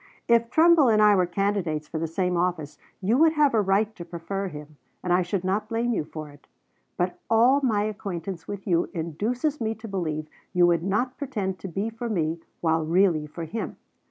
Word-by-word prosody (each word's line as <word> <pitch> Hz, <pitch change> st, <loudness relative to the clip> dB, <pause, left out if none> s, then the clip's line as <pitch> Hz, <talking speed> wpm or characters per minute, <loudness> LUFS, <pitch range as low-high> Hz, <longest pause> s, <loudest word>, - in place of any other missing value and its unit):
"If 235 Hz, 0 st, +3 dB
Trumbull 320 Hz, +1 st, +5 dB
and 215 Hz, -1 st, +4 dB
I 210 Hz, -1 st, +6 dB
were 180 Hz, -2 st, +2 dB
candidates 175 Hz, -5 st, -1 dB
for 160 Hz, -, -4 dB
the 165 Hz, -, -1 dB
same 180 Hz, +2 st, -1 dB
office 170 Hz, -4 st, -1 dB, 0.2 s
you 220 Hz, +7 st, +2 dB
would 320 Hz, 0 st, +5 dB
have 295 Hz, -4 st, +3 dB
a 220 Hz, -, +4 dB
right 205 Hz, +2 st, +1 dB
to 175 Hz, -, -7 dB
prefer 175 Hz, +3 st, -4 dB
him, 150 Hz, -3 st, -10 dB, 0.3 s
and 180 Hz, -, +1 dB
I 180 Hz, -, +4 dB
should 180 Hz, +1 st, -2 dB
not 195 Hz, +3 st, -1 dB
blame 235 Hz, +1 st, 0 dB
you 155 Hz, -, -1 dB
for 155 Hz, -1 st, -8 dB
it; 145 Hz, 0 st, -19 dB, 0.5 s
but 180 Hz, 0 st, -1 dB
all 245 Hz, +5 st, +5 dB
my 220 Hz, -6 st, +2 dB
acquaintance 195 Hz, -4 st, -5 dB
with 200 Hz, -1 st, -6 dB
you 170 Hz, -3 st, +1 dB
induces 230 Hz, -, -2 dB
me 220 Hz, 0 st, -1 dB
to 220 Hz, +1 st, -9 dB
believe 155 Hz, -6 st, -3 dB, 0.3 s
you 180 Hz, -1 st, +5 dB
would 170 Hz, -2 st, +3 dB
not 210 Hz, +8 st, -1 dB
pretend 205 Hz, -10 st, -3 dB
to -, -, -6 dB
be 195 Hz, +6 st, -3 dB
for 230 Hz, +1 st, -5 dB
me 165 Hz, -5 st, -1 dB, 0.2 s
while 160 Hz, -1 st, +2 dB
really 165 Hz, -2 st, +2 dB
for 165 Hz, +3 st, -7 dB
him. 200 Hz, +8 st, -5 dB
190 Hz, 205 wpm, -25 LUFS, 170-225 Hz, 0.5 s, I